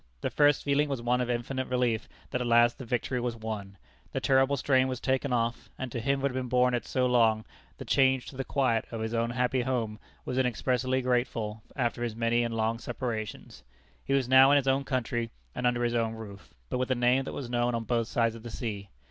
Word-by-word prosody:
The - - -2
first 145 -1 +4
feeling 145 +1 +2
was 135 -3 -2
one 120 +1 +1
of 125 - -2
infinite 125 +2 -2
relief 125 -3 0 0.2
that 125 - -1
at 125 - -1
last 120 0 +4
the 130 - -6
victory 125 +1 -1
was 120 -1 -2
won. 105 -3 -6 0.4
The - - 0
terrible 135 +1 +3
strain 130 -1 +3
was 130 -2 -3
taken 130 +1 0
off, 120 0 -1
and 130 -2 -5
to 120 - -3
him 135 +3 0
who 140 - +2
had 130 -1 -3
borne 125 0 +3
it 120 - -2
so 130 -1 +1
long, 115 -3 +3 0.3
the - - -8
change 130 -2 +3
to - - -12
the 135 - -3
quiet 125 -5 +1
of 115 - -5
his 110 +1 -3
own 115 0 +1
happy 125 +1 0
home 120 -4 -2 0.3
was 125 - -1
inexpressibly 130 +1 0
grateful 120 -4 -1
after 120 -2 -1
his 115 -2 -3
many 115 +1 +1
and 115 -1 -2
long 115 +1 0
separations. 110 - -5 0.4
He 135 - -1
was 135 -3 +1
now 130 +1 +7
in 145 - +6
his 135 -1 0
own 135 +1 +2
country 120 -3 -1 0.2
and 125 - 0
under 120 0 +1
his 120 0 +1
own 115 -1 0
roof, 105 -7 -11
but - - -2
with 130 - -1
a 130 - +2
name 125 +2 +2
that - - -5
was 135 - -5
known 120 0 0
on 115 - -2
both 115 -1 0
sides 115 -2 +1
of 115 - -10
the 120 - -8
sea. 105 -5 -5
125 Hz, 230 wpm, -29 LUFS, 115-130 Hz, 0.4 s, now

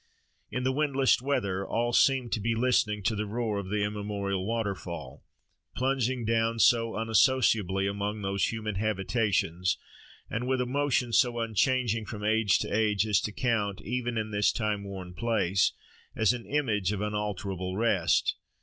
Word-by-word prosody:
In 125 - -3
the 130 - +2
windless 135 -3 +2
weather 100 -9 -1
all 120 +4 -1
seemed 130 -3 +3
to - - 0
be 115 +2 0
listening 110 -4 +1
to 110 +3 +1
the 105 0 -2
roar 110 -1 -2
of 95 -2 -6
the 105 0 0
immemorial 100 -2 -3
waterfall, 95 - -4 0.5
plunging 130 -2 0
down 115 +1 +1
so 115 0 +3
unassociably 110 -3 +2
among 100 +1 -3
these 100 0 0
human 110 -2 -3
habitations, 95 -4 0 0.5
and 125 +2 -3
with 130 0 +1
a 125 - +1
motion 130 -2 0
so 120 -1 +3
unchanging 115 0 0
from 105 -1 -7
age 110 -1 +3
to - - -3
age 105 -1 +2
as 105 -4 +2
to 105 - -3
count, 105 -4 -1
even 120 +1 -2
in 110 0 -2
this 105 0 +2
time 105 -2 -2
worn 95 -3 -7
place, 100 -4 +1 0.4
as 110 -1 +3
an 120 -2 -7
image 110 -10 0
of 105 -1 -3
unalterable 100 -3 -3
rest. 95 -7 +2
110 Hz, 160 wpm, -28 LUFS, 100-120 Hz, 0.5 s, seemed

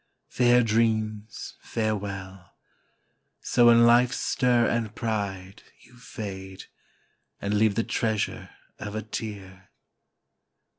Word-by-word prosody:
Fair 125 0 +4
dreams, 110 -1 -1
farewell! 100 -4 -4 0.9
So 120 -1 +4
in 115 0 +6
life's 120 +2 +4
stir 125 -2 +2
and 115 -3 -1
pride 100 -4 -4 0.2
You 125 - -20
fade, 95 -5 -8 0.8
and 100 +1 -2
leave 105 -1 +3
the 115 - +1
treasure 110 -4 -2 0.3
of 105 0 -6
a 110 - -3
tear! 100 -4 -7
110 Hz, 100 wpm, -26 LUFS, 100-115 Hz, 0.9 s, in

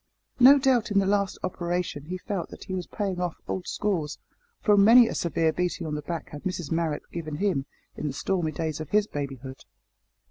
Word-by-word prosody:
No 265 +3 +9
doubt 260 -4 +2
in 205 - +1
this 195 -1 +3
last 200 -1 +1
operation 175 -4 -2
he 180 +3 -4
felt 190 -1 -4
that - - -10
he 185 - -6
was 180 -2 -3
paying 195 -4 -3
off 175 -2 -2
old 185 - -3
scores, 175 -8 -1 0.4
for 210 - +4
many 225 +4 +8
a - - -3
severe 165 -1 +1
beating 180 -2 -2
on 155 - -3
the 150 - -2
back 160 +2 -5
had 145 - -8
Mrs 180 -5 -4
Marrot 165 -2 -1
given 155 -3 -5
him 155 -6 0 0.3
in 155 - -3
the 140 - -3
stormy 170 +1 -1
days 155 0 -3
of 155 - -6
his 210 0 +3
babyhood. 135 - -6
175 Hz, 205 wpm, -26 LUFS, 155-200 Hz, 0.4 s, No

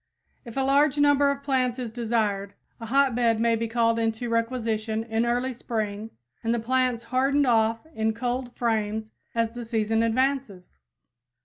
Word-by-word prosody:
If 235 +1 -9
a - - +2
large 280 +2 +3
number 285 -1 +4
of 280 0 -3
plants 255 -3 0
is 245 -3 -4
desired, 220 -4 -1 0.2
a 230 - -7
hotbed 245 -3 +2
may 230 0 +3
be 230 0 -2
called 230 0 +1
into 225 +1 -1
requisition 230 -2 -1
in 225 +1 -1
early 245 +2 0
spring 220 -3 -4 0.3
and 225 - 0
the - - -1
plants 250 0 0
hardened 275 +2 +3
off 225 -1 +2
in 220 -2 0
cold 245 +1 -2
frames 220 -2 -1 0.2
as 230 -1 +1
the 240 +1 -7
season 225 -1 0
advances. 230 - -1
230 Hz, 155 wpm, -26 LUFS, 225-255 Hz, 0.3 s, number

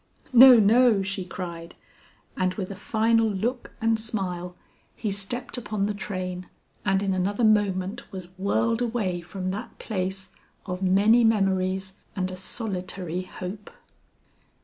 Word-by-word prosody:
"No, 250 0 +10
no," 220 -1 +5
she 190 -1 -4
cried. 170 -2 -7 0.6
And 185 0 0
with 195 -2 -4
a - - -6
final 225 +2 +2
look 235 +5 -3
and 225 0 +2
smile 180 -5 -3 0.4
he 215 -3 -3
stepped 240 +6 -2
upon 210 -3 -2
the 210 - -1
train 185 -3 -5 0.3
and 195 0 +1
in 195 -1 0
another 200 +5 0
moment 205 -1 +1
was 185 -2 -8
whirled 225 +5 0
away 220 -7 -1
from 185 +1 -4
that 215 +5 -7
place 190 -2 -4 0.3
of 180 -1 -5
many 205 +5 +4
memories 190 -3 +1 0.2
and 185 -2 -2
a - - -6
solitary 185 -3 -4
hope. 185 +2 -8
195 Hz, 135 wpm, -25 LUFS, 185-220 Hz, 0.6 s, No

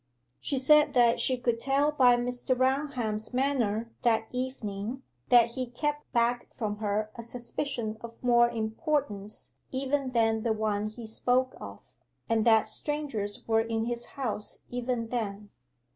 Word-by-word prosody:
She 280 - -2
said 295 +2 +5
that 235 -1 +5
she 255 - +2
could 240 -2 0
tell 275 +4 +2
by 255 -4 +5
Mr. 245 +1 -1
Raunham's 255 -5 0
manner 235 -5 0
that 225 -2 +2
evening, 250 -1 -4 0.3
that 235 -1 +6
he 255 +1 -3
kept 295 +5 -3
back 240 0 +1
from 210 -3 -2
her 210 0 -1
a 235 - -7
suspicion 235 -1 -4
of 230 0 -8
more 240 -1 +5
importance 220 -2 -2 0.2
even 270 +1 -1
than 225 -2 +2
the 225 0 +1
one 215 -1 -1
he 225 +2 -8
spoke 250 +3 0
of, - - -8 0.5
and 225 -1 +2
that 220 -2 +5
strangers 225 -4 -3
were 225 -1 +4
in 225 0 -1
his 240 0 -3
house 225 -6 -4
even 245 -2 -2
then. 210 -4 -3
240 Hz, 145 wpm, -29 LUFS, 220-260 Hz, 0.5 s, that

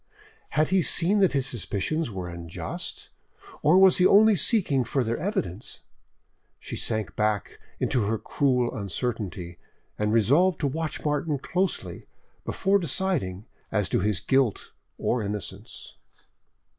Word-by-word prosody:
Had 155 0 +3
he 190 0 +3
seen 180 +5 +2
that 190 -2 +4
his 135 -2 +1
suspicions 125 +5 -2
were 95 -4 -5
unjust, 85 -1 -7 0.5
or 155 +4 +5
was 190 -1 +7
he 180 - +4
only 215 +1 +6
seeking 175 - +2
further 115 0 -1
evidence? 120 - -4 0.8
She - - -7
sank 110 -3 -2
back 105 -2 -1 0.2
into 120 -6 +1
her 110 +2 0
cruel 125 0 0
uncertainty, 100 -4 -4 0.4
and 105 0 +1
resolved 145 - +3
to 145 - +2
watch 155 +3 -4
Martin 150 0 0
closely, 180 +7 -2 0.4
before 195 +1 +2
deciding 135 - -2 0.3
as 105 -3 +1
to - - +1
his 105 -2 0
guilt 130 +1 +1 0.3
or 120 - 0
innocence. 105 -1 -6
125 Hz, 130 wpm, -26 LUFS, 105-170 Hz, 0.8 s, was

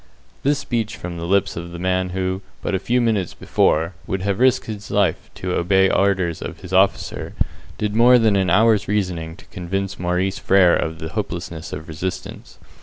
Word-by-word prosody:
This 145 +1 +2
speech 115 -5 -2
from 85 0 -6
the 85 0 -4
lips 100 +1 +2
of 85 +1 -6
a - - -5
man 90 +1 0
who, 95 +1 -2 0.2
but - - -2
a 95 - +1
few 120 +6 +1
minutes 110 -7 0
before, 80 +3 +1
would 95 -1 -2
have 100 0 -1
risked 130 0 +3
his 105 -2 -7
life - - +1
to 90 -1 -3
obey 95 +2 +3
orders 95 -4 +1
of 80 - -7
his 90 -1 -9
officer, 95 +1 +1 0.4
did 105 0 -2
more 120 +2 +7
than 110 -3 +3
an 95 -2 +2
hour's 105 +2 +4
reasoning 90 -6 -2
to - - -16
convince 95 +1 -4
Maurice 90 +2 0
Frere 95 -3 +5
of 80 0 -2
the 80 0 -6
hopelessness 85 -5 -5
of 80 +1 -6
resistance. 90 +3 -6
95 Hz, 185 wpm, -21 LUFS, 85-105 Hz, 0.4 s, more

